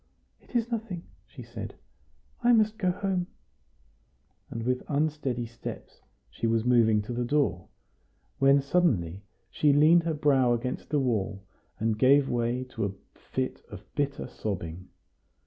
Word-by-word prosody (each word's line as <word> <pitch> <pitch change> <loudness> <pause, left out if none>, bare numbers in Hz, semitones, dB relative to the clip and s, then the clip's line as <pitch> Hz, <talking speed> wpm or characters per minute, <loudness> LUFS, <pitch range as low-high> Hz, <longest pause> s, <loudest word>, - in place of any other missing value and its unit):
"It - - -18
is 235 0 +1
nothing," 210 -7 -3 0.2
she - - -11
said; - - -7 0.7
"I 240 0 +5
must 215 -1 +3
go 185 -3 +2
home;" 185 -1 -1 1.2
and 115 - -5
with 125 +1 0
unsteady 145 -5 -1
steps 115 0 -9 0.3
she 115 - -3
was 115 0 +1
moving 110 -4 +4
to 120 - -5
the 120 +1 -1
door, 120 -9 0 0.7
when 135 +1 +5
suddenly 110 - +1 0.3
she 150 - +3
leaned 155 +4 +6
her 165 -1 -1
brow 135 -4 +3
against 120 +2 -3
the 150 0 +2
wall, 105 -6 -1 0.4
and 110 -1 0
gave 135 +2 +5
way 120 +1 0
to - - -2
a 100 - -3 0.4
fit - - -2
of - - -10
bitter 140 -1 -1
sobbing. 90 -7 -5
130 Hz, 145 wpm, -28 LUFS, 115-155 Hz, 1.2 s, leaned